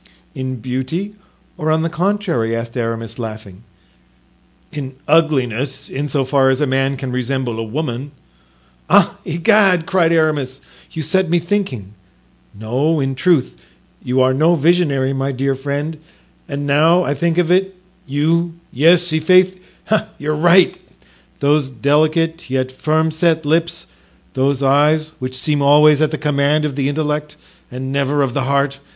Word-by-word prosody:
"In 130 0 -4
beauty 130 - -4 0.5
or 155 - -1
on 160 +1 +2
the - - 0
contrary?" 170 - -1
asked 115 +1 -5
Aramis, 115 -1 -4
laughing. 110 -4 -8 1.1
"In 135 -3 -6
ugliness, 140 -5 0
in 145 +2 -3
so 135 0 0
far 135 0 +2
as 130 0 +1
a 150 - +2
man 135 0 0
can 130 -1 -5
resemble 125 -2 -2
a - - -2
woman." 130 +2 -4 0.8
"Ah! - - +4
Egad!" 180 0 +3
cried 170 -2 +2
Aramis, 150 -5 0 0.3
"you 160 - -5
set 185 +3 0
me 175 - +3
thinking. 165 - -3 0.7
No, 135 +9 0
in 135 -1 -1
truth 150 0 +1 0.5
you 125 +1 0
are 130 0 +3
no 160 +6 +3
visionary, 145 -4 +1
my 135 +1 -2
dear 135 +1 -1
friend, 145 +3 -4 0.5
and 145 0 -4
now 160 +5 +3
I 140 - -1
think 165 +4 -1
of 175 -1 +2
it—you—yes, 170 -3 0
i'faith, 185 +4 +3 0.6
you're 150 +1 -2
right—those 155 -4 0
delicate, 155 +6 0
yet 130 0 -1
firm 155 +4 0
set 160 0 +1
lips, 165 +3 0 0.5
those 135 +1 0
eyes 150 +3 +2
which 130 0 -4
seem 145 +2 0
always 150 +1 +5
at 155 - +3
the 155 - -4
command 150 0 +1
of 145 -3 -3
the 140 -1 -1
intellect 150 0 -3 0.3
and 130 +1 -6
never 140 +1 0
of 130 -3 -2
the 135 -1 -1
heart! 140 0 0
145 Hz, 145 wpm, -17 LUFS, 130-165 Hz, 1.1 s, always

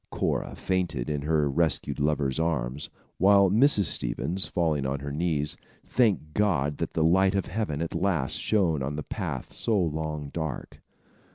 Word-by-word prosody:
Cora - - -2
fainted 85 -9 -2
in 75 -1 -2
her 75 0 +1
rescued 75 -1 0
lover's 70 -1 0
arms, 75 -4 -2 0.3
while 100 0 +5
Mrs. 115 0 +6
Stevens, 85 +5 0
falling 80 -5 0
on 70 +1 -2
her 70 0 -5
knees, 75 -1 -1 0.3
thanked 100 -11 +1
God 75 -9 +1
that - - -3
the 80 - +1
light 95 +4 +3
of 95 - 0
Heaven 85 -8 -3
at 85 - -5
last 85 -9 0
shone 90 -9 +1
on 70 +2 -3
the 75 - -4
path - - -5
so 110 -3 0
long 80 -3 -3
dark. 80 -4 -6
80 Hz, 160 wpm, -27 LUFS, 70-95 Hz, 0.3 s, Mrs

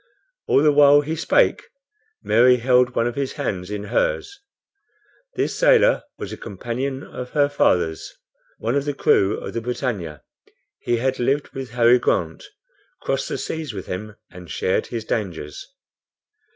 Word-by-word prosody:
All 140 - +4
the 150 - +5
while 145 0 +6
he 155 +3 -4
spake, 160 - +2 0.6
Mary 125 +3 +5
held 125 0 +2
one 115 - +1
of 120 - -1
his 135 +1 -3
hands 95 -10 -4
in 105 -1 -4
hers. - - -1 1.0
This - - -1
sailor - - +4 0.2
was 105 - -6
a - - -7
companion 125 +6 -5
of 125 0 -8
her 145 -1 +3
father's, 90 - 0 0.5
one 115 +2 -2
of 140 0 0
the 145 -1 -2
crew 100 -5 +2
of - - -7
the 115 - -3
BRITANNIA. 115 - -4 0.6
He 120 - 0
had 130 +2 -1
lived 135 +4 0
with 135 -2 -7
Harry 120 0 +5
Grant, - - -1 0.6
crossed - - -1
the - - -3
seas 155 -8 -5
with 95 - -6
him 105 +3 -6 0.2
and 90 -2 -12
shared 95 - -1
his 115 -2 -5
dangers. 85 -10 -4
125 Hz, 155 wpm, -22 LUFS, 105-140 Hz, 1.0 s, while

